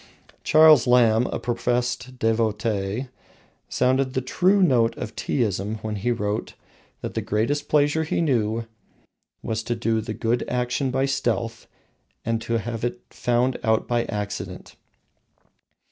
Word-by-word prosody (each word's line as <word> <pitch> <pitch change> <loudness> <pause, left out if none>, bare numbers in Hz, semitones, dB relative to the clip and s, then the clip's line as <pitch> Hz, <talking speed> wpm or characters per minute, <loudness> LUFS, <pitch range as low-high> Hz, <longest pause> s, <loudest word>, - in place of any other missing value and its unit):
Charles 155 -4 +6
Lamb, 120 -1 +4
a - - -3
professed 125 +1 -2
devotee, 110 0 -1 0.6
sounded 130 +1 +1
the 130 - +1
true 185 +9 +3
note 120 -8 +3
of 120 -2 -6
Teaism 105 -4 -1
when 110 -1 -3
he 110 +5 -1
wrote 105 -2 -2 0.5
that - - -5
the - - -1
greatest 145 +8 -1
pleasure 150 +1 +3
he 155 - -1
knew 115 -7 0 0.8
was 110 0 -2
to 120 +2 -2
do 115 -1 0
a 110 0 -4
good 115 +2 0
action 125 +2 -1
by 130 +1 +1
stealth, 120 -4 -2 0.6
and 115 0 0
to 115 0 -1
have 115 +1 -4
it 120 0 -2
found 125 +1 0
out 110 -2 +1
by 120 -1 +1
accident. 105 -1 -5
120 Hz, 135 wpm, -24 LUFS, 110-130 Hz, 0.8 s, Charles